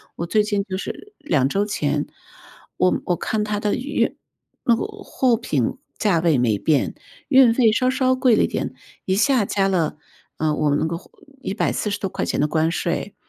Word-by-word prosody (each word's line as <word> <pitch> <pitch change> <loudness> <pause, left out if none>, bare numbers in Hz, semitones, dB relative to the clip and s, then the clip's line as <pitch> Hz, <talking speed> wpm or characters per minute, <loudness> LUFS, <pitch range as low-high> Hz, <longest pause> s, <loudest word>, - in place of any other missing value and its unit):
我 170 - -3
最 210 +5 +2
近 205 -1 -1
就 190 -2 -4
是 415 - -7
2 145 - +1
周 200 +4 +1
前， 150 -7 -1 0.7
我 185 - +2
我 175 - 0
看 215 -1 -1
它 210 -1 -2
的 210 -1 0
运 280 +4 -1 0.5
那 235 - +4
个 - - -2
货 395 - 0
品 145 - -1 0.2
价 195 -6 +2
位 160 -4 +3
没 115 -4 +2
变， 145 +5 +1 0.3
运 260 -4 +6
费 230 -3 +4
稍 255 +3 +2
稍 260 0 +2
贵 255 -3 +4
了 - - +3
一 - - +2
点， - - -3 0.3
一 190 - +1
下 240 0 +3
加 195 0 +1
了 170 -5 0 0.4
呃， 155 -1 +1
我 150 -2 +1
那 145 - 0
个 165 +1 -2 0.4
140 205 -1 -1
多 195 - -2
块 - - -3
钱 - - -2
的 150 - +3
关 160 +1 +1
税。 175 +3 -2
200 Hz, 195 characters per minute, -22 LUFS, 160-240 Hz, 0.7 s, 运